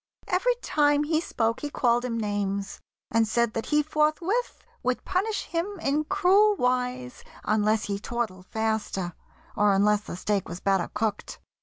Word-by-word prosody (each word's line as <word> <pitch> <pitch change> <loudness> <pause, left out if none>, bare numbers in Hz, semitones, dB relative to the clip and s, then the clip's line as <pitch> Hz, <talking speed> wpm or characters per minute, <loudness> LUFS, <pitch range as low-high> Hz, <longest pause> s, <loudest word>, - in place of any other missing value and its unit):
Every 485 +7 +2
time 290 -1 +3
He 315 +1 +1
spoke 230 -8 -1
he 295 - -4
called 240 -3 +2
him 240 -2 -2
names, 200 -2 -2 0.3
and 225 0 +3
said 235 +1 +1
that 225 - -3
he 300 0 +3
Forthwith 310 +10 0 0.2
would 255 0 -1
punish 400 +4 -1
him 360 +4 -3
in 300 0 0
cruel 400 +3 +4
wise 250 -2 -1 0.2
Unless 215 +1 +2
he 200 -1 -3
tortled 210 -5 -4
faster, 220 -5 -2 0.4
or 205 -2 +4
unless 205 +1 +3
The 210 - -7
steak 200 +1 -1
was 175 - -6
better 195 -3 +1
cooked. 210 -1 -2
235 Hz, 155 wpm, -26 LUFS, 210-305 Hz, 0.4 s, cruel